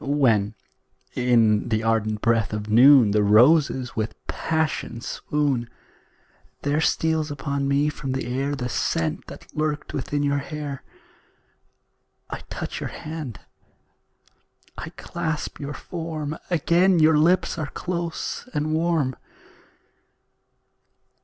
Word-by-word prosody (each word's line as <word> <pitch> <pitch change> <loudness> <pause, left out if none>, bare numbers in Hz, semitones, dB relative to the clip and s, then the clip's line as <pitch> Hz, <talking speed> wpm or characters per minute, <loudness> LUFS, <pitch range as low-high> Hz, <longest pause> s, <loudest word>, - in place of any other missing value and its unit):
When, 115 -8 +2 0.6
in 115 -4 +3
the 110 -1 0
ardent 110 -2 0
breath 115 -2 +1
of 105 0 -3
noon, 125 -1 +7
The 105 +1 +3
roses 125 +5 +4
with 110 0 -2
passion 160 -7 -2
swoon; 135 -1 -1 0.9
There 145 +2 +1
steals 160 -1 +1
upon 140 -1 -2
me 140 +2 +2
from 140 -3 -4
the 135 - -2
air 135 +4 -1
The 125 -2 -3
scent 80 -9 -1
that - - -12
lurked 150 -1 -2
within 145 +1 -2
your 140 0 +1
hair; 145 -1 -6 1.5
I - - -4
touch - - -5
your - - -4
hand, 155 -8 -7 1.3
I - - -6
clasp 160 -2 -4
your 145 0 -5
form 160 -3 -5
Again 175 +2 +3
your 155 -1 +5
lips 170 +1 +2
are 150 -3 -3
close 175 +5 -4
and 150 +1 0
warm. 160 -5 +1
140 Hz, 115 wpm, -24 LUFS, 120-155 Hz, 1.5 s, noon